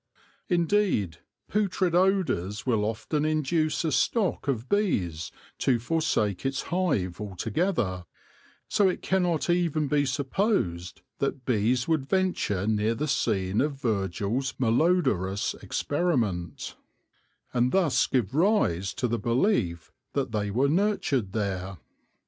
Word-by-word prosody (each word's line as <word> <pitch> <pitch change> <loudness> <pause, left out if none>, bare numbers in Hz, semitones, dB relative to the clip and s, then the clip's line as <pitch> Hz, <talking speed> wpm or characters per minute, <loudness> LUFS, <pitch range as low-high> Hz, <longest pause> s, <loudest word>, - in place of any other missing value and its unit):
Indeed, 175 - +1 0.3
putrid 190 -4 0
odours 175 - +1
will 110 -5 +1
often 115 +7 -2
induce 155 +1 0
a 160 - +1
stock 190 - +1
of 125 -3 -1
bees 95 - 0 0.3
to 130 -3 +2
forsake 120 - 0
its 135 0 -1
hive 130 - -1
altogether; 105 - -1 0.6
so 200 -2 +3
it 180 - -4
cannot 180 -4 +1
even 170 -4 +1
be 145 -1 +1
supposed 130 - -1 0.2
that 135 -2 -2
bees 125 +1 +1
would 155 -5 0
venture 180 - 0
near 110 +1 +1
the 150 +6 -2
scene 100 -7 +1
of 140 -1 -2
Virgil's 110 +3 -1
malodorous 120 - +1
experiment, 120 - -1 0.8
and 125 +1 +2
thus 160 -10 +3
give 120 -5 0
rise 150 - +2
to 130 -2 0
the 115 0 -1
belief 115 - 0 0.2
that 135 -4 -1
they 105 -2 -1
were 125 +7 +2
nurtured 150 - +1
there. 100 -3 -3
130 Hz, 120 wpm, -27 LUFS, 105-170 Hz, 0.8 s, so